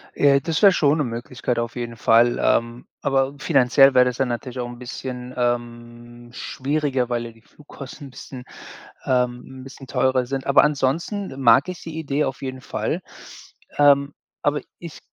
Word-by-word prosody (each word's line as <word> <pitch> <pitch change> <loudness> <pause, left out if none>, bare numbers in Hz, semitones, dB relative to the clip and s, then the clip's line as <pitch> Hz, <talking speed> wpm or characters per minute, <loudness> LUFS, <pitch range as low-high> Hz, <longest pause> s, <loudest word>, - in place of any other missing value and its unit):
Äh, 140 -1 +4
das 160 +6 -2
wäre 200 -2 +8
schon 150 -3 +2
'ne - - +2
Möglichkeit 120 0 -3
auf 115 0 -4
jeden 120 -1 -5
Fall, 115 +2 +3
ähm, 115 +1 0 0.2
aber 135 0 0
finanziell 135 -2 +4
wäre 125 -1 +6
das 125 -1 -1
dann 130 0 -1
natürlich 120 +2 -5
auch 120 - -3
'n 120 0 -10
bisschen, 125 0 -7
ähm, 120 0 -4
schwieriger, 135 -1 -2
weil 120 -1 -2
ja 115 - -8
die 115 - -22
Flugkosten 140 +1 -12
bisschen 125 0 -10 0.6
ähm, 125 +1 -1
'n - - -11
bisschen 135 0 -12
teurer 130 -1 +1
sind, 135 +1 -4
aber 140 - +5
ansonsten 150 +4 -2
mag 130 +6 +5
ich 180 - -7
die 160 -1 -8
Idee 150 -1 -1
auf 135 - -5
jeden 130 -1 -5
Fall. - - -3 0.8
Ähm, 145 0 +4 0.3
aber 145 -1 0 0.2
ich 170 -3 -10
130 Hz, 170 wpm, -22 LUFS, 120-140 Hz, 0.8 s, wäre